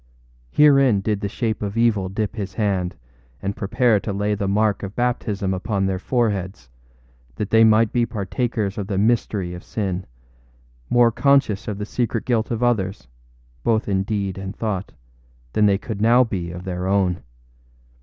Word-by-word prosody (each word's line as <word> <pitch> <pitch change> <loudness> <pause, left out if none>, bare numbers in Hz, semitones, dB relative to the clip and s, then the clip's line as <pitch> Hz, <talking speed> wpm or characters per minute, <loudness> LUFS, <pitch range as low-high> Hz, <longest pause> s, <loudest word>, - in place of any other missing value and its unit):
Herein 135 - +5
did 105 0 -1
the 100 - -2
shape 110 0 -2
of 105 +1 -3
evil 110 -5 +2
dip 105 +3 -3
his 100 -3 -5
hand 95 -5 0 0.4
and 100 +4 -3
prepare 115 +1 +2
to 105 - -4
lay 100 +1 0
the 100 -1 -2
mark 105 +1 +1
of 100 0 -6
baptism 105 -5 -1
upon 95 +1 -1
their 95 -1 -1
foreheads, 100 - -2 0.6
that 105 - -4
they 115 0 +6
might 110 0 +4
be 120 -1 +2
partakers 105 0 -2
of 100 - -4
the 100 - -2
mystery 105 -4 +1
of 90 - -8
sin, 95 -4 -3 0.8
more 120 -1 +5
conscious 115 -5 +2
of 105 -2 -3
the 105 - -4
secret 115 0 -2
guilt 115 -3 0
of 115 0 -2
others, 95 - 0 0.6
both 110 -1 +1
in 95 -2 +1
deed 100 -2 -2
and 95 +1 -6
thought, 105 -4 -3 0.6
than 105 -1 +4
they 100 -1 +3
could 105 0 -6
now 120 +3 +6
be 95 -7 -3
of 90 +1 -7
their 90 0 -3
own. 95 -2 +1
105 Hz, 170 wpm, -22 LUFS, 95-115 Hz, 0.8 s, they